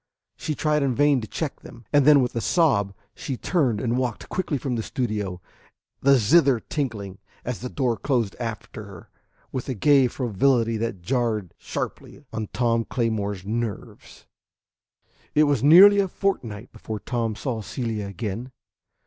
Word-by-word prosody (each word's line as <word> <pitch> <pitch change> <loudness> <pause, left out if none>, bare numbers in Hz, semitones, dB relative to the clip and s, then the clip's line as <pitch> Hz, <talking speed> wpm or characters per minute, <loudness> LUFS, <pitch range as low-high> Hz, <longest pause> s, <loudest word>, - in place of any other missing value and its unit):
She 155 - -4
tried 150 0 +1
in 135 -3 +1
vain 145 -1 +3
to 110 - -7
check 155 +4 -4
them, 115 - -13
and 145 -2 +5
then 145 -3 +7
with 125 - -3
a 115 - -1
sob 100 - +2 0.2
she 130 - -5
turned 130 - +1
and 120 +1 0
walked 125 -2 -3
quickly 175 -5 -1
from 130 -1 -3
the 115 - -1
studio, 105 -7 -3 0.6
the 140 0 +5
zither 135 +2 +4
tinkling, 110 -9 -4 0.3
as 125 -2 -3
the 125 - -5
door 125 -4 0
closed 115 -3 -1
after 110 -2 -6
her, 100 -4 -13 0.4
with 130 +1 -4
a 130 - -2
gay 135 +3 +4
frivolity 120 0 +1
that 110 -5 -4
jarred 115 -5 -1
sharply 145 - -6
on 110 -1 -3
Tom 115 -2 +1
Claymore's 105 -6 -2
nerves. 110 -1 -5 1.1
V 150 - +5
It - - +7
was 145 -5 +2
nearly 190 +8 +8
a 195 - +2
fortnight 125 - -3
before 110 -1 -6
Tom 115 -1 -2
saw 115 -1 -3
Celia 110 -2 -4
again. 105 +5 -5
120 Hz, 160 wpm, -24 LUFS, 110-140 Hz, 1.1 s, nearly